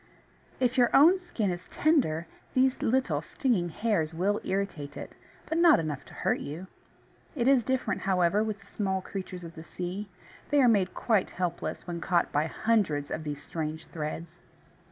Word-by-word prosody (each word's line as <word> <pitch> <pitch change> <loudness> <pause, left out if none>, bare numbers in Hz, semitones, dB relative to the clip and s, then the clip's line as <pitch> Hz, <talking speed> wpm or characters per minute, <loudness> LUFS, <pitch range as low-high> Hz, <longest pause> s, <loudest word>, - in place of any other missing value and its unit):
If 255 0 +2
your 240 - +5
own 335 +7 +7
skin 230 - -2
is 175 +1 -6
tender, 245 - +2 0.3
these 260 0 +3
little 260 +2 +1
stinging 215 -11 0
hairs 165 -4 0
will 200 +5 +1
irritate 175 -7 -3
it, - - -7 0.3
but 320 - -1
not 335 -2 +7
enough 150 -3 -3
to - - -14
hurt - - 0
you. 160 +6 -6 0.7
It 245 -3 0
is 270 -2 +6
different, 260 +2 -1
however, 190 +2 +2
with 215 -2 -4
the - - -18
small 190 -2 -2
creatures 185 -2 -6
of 165 -1 -8
the 160 -2 -9
sea. 185 +4 -5 0.4
They 290 - +4
are 260 - +6
made 200 -5 +2
quite 220 -5 +1
helpless 180 -1 -3
when 170 -1 -5
caught 175 -1 +1
by 150 +2 +1
hundreds 185 -9 0
of 160 - -3
these 145 -1 -5
strange 160 0 -4
threads. 165 +2 -5
190 Hz, 175 wpm, -29 LUFS, 165-235 Hz, 0.7 s, own